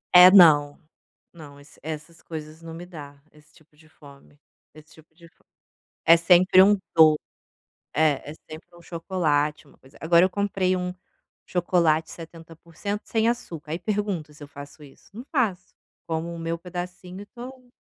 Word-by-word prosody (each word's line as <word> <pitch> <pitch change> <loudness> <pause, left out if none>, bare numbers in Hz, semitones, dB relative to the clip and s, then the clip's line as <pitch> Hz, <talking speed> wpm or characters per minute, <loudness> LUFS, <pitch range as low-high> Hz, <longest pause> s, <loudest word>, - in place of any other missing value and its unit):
É, 180 +1 +11
não, 155 -7 +6 0.6
não 145 -4 -13
esse 145 - -19
essas 160 +2 -8
coisas 155 0 -9
não 165 0 -10
me 165 +2 -9
dá, 145 -5 -12
esse 150 0 -23
tipo 155 -1 -25
de 155 +1 -22
fome 145 -1 -18 0.4
esse 155 0 -17
tipo 160 0 -21
de 170 0 -17
fo - - -31 0.6
É 165 - +7
sempre 180 +2 +5
um 205 +1 +4 0.2
do 155 -2 +6 0.8
É, 150 -2 +1
é - - -8 0.2
sempre 155 +2 -10
um 170 - -16
chocolate, 155 -4 -2
uma - - -22
coisa. 130 - -20
Agora 170 +2 +4
eu 185 - +3
comprei 190 -2 -1
um 180 0 -4 0.5
chocolate 170 -3 0
70% 165 +4 -8
sem 225 0 0
açúcar, 165 -11 -5
aí 165 - -2
pergunto 195 -5 -3
se 150 0 -16
eu 145 - -10
faço 145 +2 -12
isso? 140 -2 -18
Não 235 +4 -9
faço. 215 - -2 0.3
Como 165 +1 -4
o - - -8
meu 165 0 -3
pedacinho 180 +2 -8
e 205 - -10
tô 250 +1 -12
165 Hz, 170 wpm, -24 LUFS, 155-185 Hz, 0.8 s, É